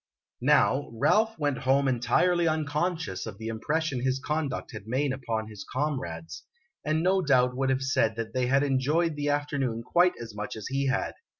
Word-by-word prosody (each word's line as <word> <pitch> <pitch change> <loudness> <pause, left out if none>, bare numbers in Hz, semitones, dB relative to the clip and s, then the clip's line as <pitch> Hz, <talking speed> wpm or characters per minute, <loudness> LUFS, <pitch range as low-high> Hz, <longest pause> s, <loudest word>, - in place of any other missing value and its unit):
Now, 140 +2 +3
Ralph 220 - +2
went 145 -4 -1
home 135 +1 +2
entirely 170 +8 +2
unconscious 155 - -1
of 105 -3 -7
the 110 +1 -5
impression 145 +5 -1
his 130 0 +1
conduct 150 -1 -3
had 105 -1 -9
made 130 +3 0
upon 115 -5 -3
his 105 -3 -9
comrades, 85 - -4 0.4
and 155 +1 0
no 190 +1 +3
doubt 125 -5 +3
would 135 +1 0
have 135 0 +1
said 115 -4 +1
that 115 -1 -5
they 130 -1 0
had 135 +2 +3
enjoyed 145 +4 +1
the 145 0 -1
afternoon 140 -5 -1
quite 175 +8 +3
as 115 -2 -8
much 105 0 -5
as 110 - -7
he 135 +1 0
had. 135 0 0
135 Hz, 180 wpm, -27 LUFS, 115-150 Hz, 0.4 s, Now